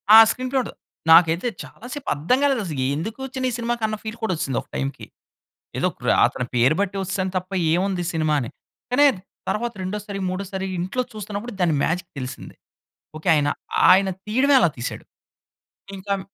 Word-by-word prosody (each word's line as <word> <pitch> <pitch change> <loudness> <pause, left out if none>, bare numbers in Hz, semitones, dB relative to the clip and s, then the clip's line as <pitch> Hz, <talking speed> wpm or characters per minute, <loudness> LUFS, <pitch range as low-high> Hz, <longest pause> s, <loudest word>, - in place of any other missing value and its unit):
ఆ! - - +12
Screen 255 0 -4
play 270 - +2
ఉండదు. - - -8 0.4
నాకైతే 170 +5 +6 0.2
చాలా - - -13
సేపు 290 -2 -5
అర్థం 165 - +2
కాలేదసలు. 200 - 0
ఎందుకు 215 - -5
వచ్చనీసినిమాకి 240 -3 -2
అన్న 215 - -2
ఫీల్ 220 +1 -6
కూడా 220 - +1
వచ్చిసింది 135 -5 -2
ఒక - - -20
టైమ్‌కి. 135 +1 -3 0.7
ఏదో - - +2
ప్ర - - -5 0.2
అతని 125 - -3
పేరు 125 +5 +4
బట్టి 200 0 -1
వచ్చేసాను 190 0 -2
తప్ప, 185 +1 -3 0.2
ఏవుంది? 185 +1 0
సినిమా 155 -2 +1
అని. 115 - -5 0.4
కానీ, 285 +4 +5 0.4
తర్వాత 235 +2 -1
రెండోసారి, 200 +1 -4
మూడోసారి, 190 0 -4
ఇంట్లో 190 +8 -1
చూస్తున్నప్పుడు, 210 +2 -6
దాని 170 -4 +3
మ్యాజిక్ 175 +1 -2
తెలిసింది. 130 0 -7 0.6
ఓకె. 155 +3 -2
ఆయన, 145 -1 +2 0.4
ఆయన 190 +1 +5 0.2
తీయడమే 260 +6 +3
అలా 175 - +4
తీసాడు. 120 - -5 0.9
ఇంకం 195 +1 -2
195 Hz, 160 wpm, -23 LUFS, 165-230 Hz, 0.9 s, ఆ